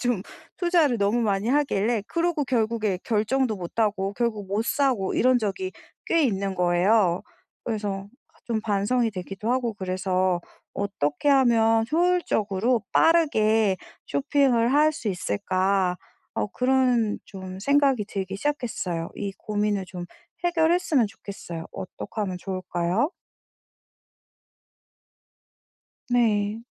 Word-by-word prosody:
좀 245 -6 0 0.3
투자를 335 - +2
너무 205 +4 +2
많이 205 0 0
하길래 240 -6 +1
그러고 335 -3 0
결국에 220 -6 0
결정도 230 +2 +1
못 180 +4 -8
하고 200 -3 +1
결국 215 -4 -2
못 210 +3 0
사고 255 -9 +1
이런 255 0 +4
적이 235 - -2 0.4
꽤 330 -3 +3
있는 195 -4 -1
거에요. 180 +1 +3 0.4
그래서 205 -3 -3 0.4
좀 225 -2 -1
반성이 220 +3 +1
되기도 195 +4 -3
하고 245 -3 0
그래서 185 -1 0 0.3
'어떻게 200 - -1
하면 225 -4 +4
효율적으로 245 - +1
빠르게 220 - +3 0.3
쇼핑을 270 -4 +2
할 305 +2 +4
수 235 - -8
있을까?' 185 - 0 0.4
어 - - 0
그런 250 -4 +2
좀 190 -1 -9
생각이 275 -1 +3
들기 195 -2 -4
시작했어요. 205 - -2
이 200 -1 -4
고민을 205 -2 -1
좀 180 -1 -7 0.4
해결했으면 330 -6 +2
좋겠어요. 195 -5 -8
어떡하면 185 0 -5
좋을까요? 185 - -1 3.0
네. 220 -3 +1
215 Hz, 250 characters per minute, -25 LUFS, 195-255 Hz, 3.0 s, 이런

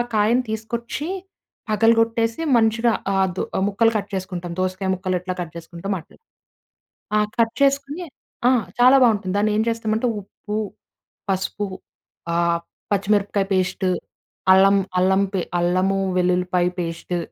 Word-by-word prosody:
కాయను 225 +4 +3
తీసుకొచ్చి, 230 +5 -4 0.6
పగలగొట్టేసి 225 +4 +2
మంచిగా 230 +1 +3 0.2
ఆహ్, 190 -1 +3
దొ - - 0 0.3
ముక్కలు 225 +3 +3
కట్ 205 0 -3
చేసుకుంటాం. 180 -2 -4
దోసకాయ 185 +1 -1
ముక్కలెట్లా 185 -1 -2
కట్ 170 -3 -5
చేసుకుంటామో 170 +4 -5
అట్ల. 160 - -18 1.1
ఆ! - - +5 0.2
కట్ 230 -1 +2
చేసుకొని 280 +5 +1 0.4
ఆ! - - +6 0.3
చాలా 255 +2 +7
బాగుంటుంది. 205 -6 +3
దాన్ని 210 +1 +2
ఏం 220 - +3
చేస్తామంటే 225 +1 0
ఉప్పు, 210 +2 -7 0.7
పసుపు 195 +2 -1 0.7
ఆహ్, 170 0 +2 0.3
పచ్చిమిరపకాయ 200 0 +1
పేస్టు, 185 0 0 0.6
అల్లం 195 +1 +6 0.2
అల్లం 190 +2 +3 0.4
అల్లము, 185 +3 +1 0.2
వెల్లుల్లిపాయ 180 0 +2
పేస్టు 170 +1 -3
200 Hz, 115 wpm, -22 LUFS, 185-225 Hz, 1.1 s, చాలా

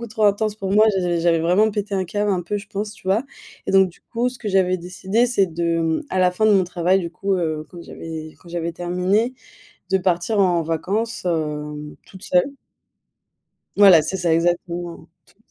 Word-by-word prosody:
beaucoup 235 - -5
trop 215 0 -1
intense 210 +1 +2
pour 195 -2 -3
moi. 215 +2 +6
J'avais 175 -2 0
j'avais 165 -1 +3
vraiment 180 +7 +3
pété 205 -1 -3
un 190 - 0
câble 205 +3 -1
un 180 - -1
peu, 190 +5 -3
je 200 - -11
pense, 210 +1 -4
tu 210 - -16
vois. 200 +6 +2 0.4
Et - - -1
donc 190 -1 +5
du 170 - -19
coup, 240 +1 -2
ce 250 - -8
que 215 - -5
j'avais 190 -2 +2
décidé, 190 +6 -1
c'est 205 -6 +2
de, 170 0 -1
mmh, 165 - 0
à 185 - -1
la 180 -1 +3
fin 215 +4 0
de 215 - +5
mon 190 -2 +4
travail, 180 +1 +1
du 170 -3 -3
coup, 195 +2 -1
heu, 155 -3 -2
quand 175 - -10
j'avais 160 -2 -8
quand 175 - -16
j'avais 170 -1 -3
terminé, 180 +8 0 0.6
de 190 - +3
partir 180 +3 0
en 180 -3 +3
vacances, 200 +8 -2
hem, 150 -3 -3
toute 190 -1 -14
seule. 180 +11 +1 1.2
Voilà, 190 -6 +8
c'est 190 - -3
ça 175 -2 +1
exactement 175 0 -2 0.2
toute - - -26
180 Hz, 210 wpm, -21 LUFS, 170-205 Hz, 1.2 s, Voilà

